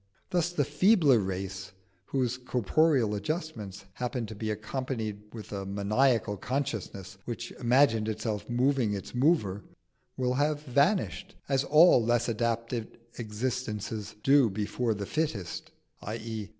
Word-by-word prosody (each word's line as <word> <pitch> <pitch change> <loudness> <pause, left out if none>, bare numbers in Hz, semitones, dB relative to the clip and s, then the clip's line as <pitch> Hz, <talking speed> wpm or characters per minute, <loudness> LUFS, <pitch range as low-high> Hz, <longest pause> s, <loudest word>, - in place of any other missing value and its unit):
Thus 175 -1 +1
the 150 -5 +1
feebler 150 - +4
race, 95 0 -4 0.3
whose 125 -1 0
corporeal 125 - +2
adjustments 105 - -4
happened 125 0 -3
to 110 - -7
be 110 +1 -3
accompanied 110 -1 -3
with 110 -2 -9
a 100 -1 -3
maniacal 105 +3 +1
consciousness 110 -7 -4
which 120 0 -5
imagined 120 -3 +3
itself 110 -1 -3
moving 125 -3 +2
its 100 - -7
mover, 125 - +2 0.6
will 125 -1 +1
have 145 +2 0
vanished, 165 - +1
as 135 -1 +2
all 155 -4 +6
less 120 0 +2
adapted 115 0 -2 0.2
existences 110 -2 -3
do 135 -3 +5
before 110 +3 -1
the 100 0 -4
fittest 115 - -3 0.3
_i.e. 110 -1 -5
115 Hz, 125 wpm, -29 LUFS, 105-135 Hz, 0.6 s, all